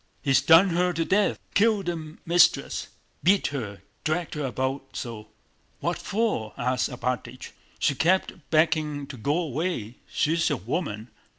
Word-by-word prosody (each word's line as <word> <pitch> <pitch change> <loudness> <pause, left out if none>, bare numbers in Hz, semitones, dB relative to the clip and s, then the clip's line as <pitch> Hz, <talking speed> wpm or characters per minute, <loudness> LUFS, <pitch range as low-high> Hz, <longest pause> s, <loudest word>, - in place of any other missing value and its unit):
"He's 135 -2 +4
done 165 +7 +7
her 180 +1 +2
to 165 0 -1
death. 200 +4 +2 0.2
Killed 210 -2 +3
the 160 -2 -5
mistress!... 175 +1 +3 0.3
Beat 190 +5 +3
her... 105 -8 -5 0.2
dragged 160 +2 -1
her 150 -2 -2
about 130 +2 -3
so!..." 110 -3 -6 0.5
"What - - -2
for?" 205 - -1
asked 125 0 0
Alpátych. 125 0 -4 0.3
"She 145 - +2
kept 180 +7 +2 0.2
begging 155 -2 +2
to 140 - -9
go 140 +8 0
away. 155 - -2
She's 165 +2 +1
a - - 0
woman! 110 - -3
155 Hz, 140 wpm, -26 LUFS, 125-175 Hz, 0.5 s, done